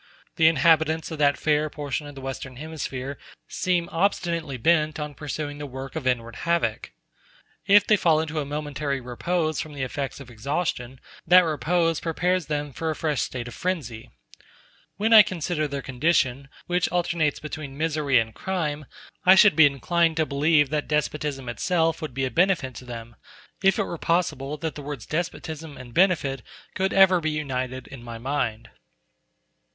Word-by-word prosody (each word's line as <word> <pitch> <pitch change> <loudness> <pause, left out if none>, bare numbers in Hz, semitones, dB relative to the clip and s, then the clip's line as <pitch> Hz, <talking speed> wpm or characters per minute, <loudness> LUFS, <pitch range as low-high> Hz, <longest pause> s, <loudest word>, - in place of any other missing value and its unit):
The 160 -1 +5
inhabitants 160 +1 +3
of 160 - -6
that 145 -1 +3
fair 150 0 +1
portion 145 0 -4
of 145 - -10
the 135 - -9
Western 135 0 -6
Hemisphere 140 -2 -5 0.3
seem 175 -2 0
obstinately 170 -5 -1
bent 155 +2 +2
on 150 -1 -4
pursuing 145 0 -5
the 145 - -5
work 135 +2 -8
of 150 -5 -3
inward 115 -2 -1
havoc. 170 -10 -1 0.8
If 205 0 +6
they 210 - +4
fall 160 -5 +3
into 160 0 -2
a - - -1
momentary 145 -1 -3
repose 155 +6 -1
from 155 - -8
the 135 - -3
effects 135 +2 -4
of 135 -3 -11
exhaustion, 130 0 -3 0.3
that 180 +2 +8
repose 165 +1 +1
prepares 180 +2 0
them 145 -2 -3
for 160 +4 -3
a 155 - -1
fresh 150 -3 -1
state 125 -2 -4
of 120 - -8
frenzy. 140 -12 -4 0.9
When 220 +3 +2
I 220 - +12
consider 170 -5 -1
their 140 -1 -5
condition, 135 -1 0 0.2
which 180 0 0
alternates 170 -4 0
between 150 -3 -7
misery 155 -4 +1
and 115 -1 0
crime, 150 - -3 0.4
I 185 +1 +8
should 200 -3 +6
be 160 -1 +8
inclined 165 +4 +1
to 160 - +2
believe 145 0 +2
that 150 -1 -1
despotism 150 -3 -2
itself 165 +6 0
would 150 -6 -6
be 135 0 0
a 130 - -3
benefit 170 -7 +2
to 125 - -10
them, 115 -2 -9 0.4
if 195 -1 +4
it - - +2
were 170 - -6
possible 150 -4 0
that 160 0 -3
the 145 - -8
words 140 -4 -6
despotism 160 -2 -4
and 125 -2 -11
benefit 155 -7 +2 0.3
could 190 0 0
ever 190 -2 +6
be 160 - 0
united 130 -4 -3
in 135 - -11
my 120 -1 -8
mind. 115 -3 -3
150 Hz, 170 wpm, -25 LUFS, 135-165 Hz, 0.9 s, I